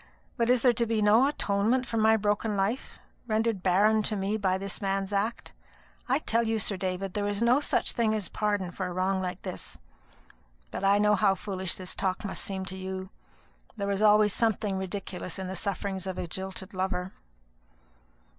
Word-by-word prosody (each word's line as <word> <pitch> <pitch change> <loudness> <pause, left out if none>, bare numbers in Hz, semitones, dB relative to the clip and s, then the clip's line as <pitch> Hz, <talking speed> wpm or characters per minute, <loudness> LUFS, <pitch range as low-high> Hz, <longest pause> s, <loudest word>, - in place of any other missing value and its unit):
"But 235 0 +1
is 250 -2 +4
there 250 -2 +6
to 235 +1 0
be 225 -1 +1
no 215 +5 +5
atonement 230 -1 +1
for 230 - -3
my 220 0 +5
broken 210 0 0
life, 200 +7 -1 0.3
rendered 220 -2 0
barren 205 +4 +4
to 215 0 -2
me 200 +1 -1
by 190 -3 +1
this 195 +2 -4
man's 195 0 -1
act? 210 +4 -2 0.6
I 260 - +4
tell 230 -6 0
you, 225 0 +1
Sir 210 -1 -1
David, 185 0 -3
there 205 -1 -1
is 205 +2 0
no 245 +4 +5
such 295 - +1
thing 225 -3 +1
as 205 -4 -2
pardon 205 -3 -1
for 185 +1 -4
a 180 - -5
wrong 190 +1 0
like 180 0 -4
this. 185 -2 -6 0.9
But - - -5
I 200 +1 +5
know 210 0 +4
how 195 -1 +3
foolish 190 -2 -3
this 185 0 -4
talk 190 +1 -2
must 195 - -2
seem 190 -1 -3
to 190 - -5
you: 190 0 -5 0.7
there 200 -1 -1
is 200 +1 -1
always 210 -1 +5
something 210 -4 0
ridiculous 190 -2 -5
in 190 - -4
the 185 +1 -5
sufferings 195 0 -2
of 185 - -4
a - - -2
jilted 190 +3 -5
lover." 185 0 -2
200 Hz, 195 wpm, -28 LUFS, 190-215 Hz, 0.9 s, there